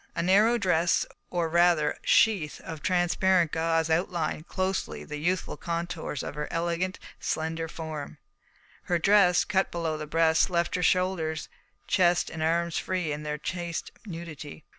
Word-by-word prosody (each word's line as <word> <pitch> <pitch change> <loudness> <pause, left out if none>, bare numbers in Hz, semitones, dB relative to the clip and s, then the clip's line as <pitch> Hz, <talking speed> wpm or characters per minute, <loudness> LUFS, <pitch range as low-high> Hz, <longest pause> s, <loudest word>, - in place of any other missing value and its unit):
A 165 - -1
narrow 210 +6 +4
dress, 180 -5 +2 0.2
or 175 -2 0
rather 170 -2 +3
sheath, 195 -10 +3
of 160 -2 -8
transparent 180 -1 +2
gauze 165 0 +1
outlined 165 -1 -1
closely 190 0 -2
the 150 - -6
youthful 180 +4 -1
contours 170 -4 -4
of - - -5
her 150 0 -4
elegant, 170 +2 -1 0.2
slender 160 +1 -2
form. 160 -3 -6 0.7
Her 175 - +1
dress, 180 0 +5
cut 190 -1 +1
below 165 -2 -2
the 150 - -5
breast, 160 +3 +3
left 170 -1 0
her 180 - 0
shoulders, 180 -3 0 0.4
chest, 175 -2 +2
and 160 - -6
arms 170 +1 +1
free 180 -4 -2
in 145 +1 -3
their 150 0 -3
chaste 170 +2 -4 0.2
nudity. 165 -4 -8
170 Hz, 145 wpm, -27 LUFS, 160-180 Hz, 0.7 s, dress